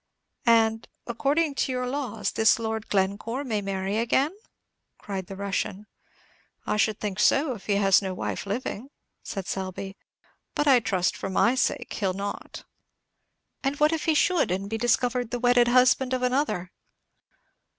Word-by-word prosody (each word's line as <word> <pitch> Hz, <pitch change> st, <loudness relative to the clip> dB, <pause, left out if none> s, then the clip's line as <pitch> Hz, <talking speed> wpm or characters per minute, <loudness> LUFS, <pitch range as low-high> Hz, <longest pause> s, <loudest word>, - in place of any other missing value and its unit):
"And, 225 Hz, -1 st, +3 dB, 0.2 s
according 280 Hz, +6 st, 0 dB
to 275 Hz, -, -1 dB
your 250 Hz, 0 st, -2 dB
laws, 245 Hz, -6 st, -3 dB
this 220 Hz, -1 st, +4 dB
Lord 220 Hz, -1 st, -4 dB
Glencore 205 Hz, +7 st, -1 dB
may 220 Hz, -6 st, -2 dB
marry 195 Hz, +1 st, -2 dB
again?" 270 Hz, +8 st, +1 dB, 0.6 s
cried 190 Hz, -3 st, -6 dB
the 195 Hz, -, -7 dB
Russian. 200 Hz, 0 st, -3 dB, 0.8 s
"I -, -, 0 dB
should 215 Hz, 0 st, +1 dB
think 205 Hz, -2 st, -4 dB
so, 275 Hz, +3 st, +3 dB
if 210 Hz, -, -11 dB
he 205 Hz, -, +2 dB
has 195 Hz, -1 st, +4 dB
no 190 Hz, -1 st, -3 dB
wife 200 Hz, -, -4 dB
living," 230 Hz, +3 st, -4 dB, 0.3 s
said 195 Hz, -3 st, -5 dB
Selby; 190 Hz, +1 st, -5 dB, 0.6 s
"but 295 Hz, -, 0 dB
I 265 Hz, -3 st, +7 dB
trust, 190 Hz, -6 st, 0 dB
for -, -, -5 dB
my 230 Hz, +5 st, +3 dB
sake, 260 Hz, -, -1 dB
he'll 195 Hz, -3 st, -1 dB
not." 200 Hz, +1 st, -6 dB, 1.0 s
"And 280 Hz, +2 st, -2 dB
what 300 Hz, +2 st, +4 dB
if 320 Hz, -, -2 dB
he 320 Hz, -, +2 dB
should, 355 Hz, +1 st, +2 dB
and 185 Hz, +2 st, -1 dB
should 200 Hz, -, -7 dB
be 225 Hz, -, -2 dB
discovered 245 Hz, 0 st, +1 dB
the 245 Hz, -, -2 dB
wedded 245 Hz, 0 st, +4 dB
husband 255 Hz, +1 st, +4 dB
of 255 Hz, -, -3 dB
another?" 250 Hz, -9 st, 0 dB
225 Hz, 160 wpm, -26 LUFS, 200-255 Hz, 1.0 s, I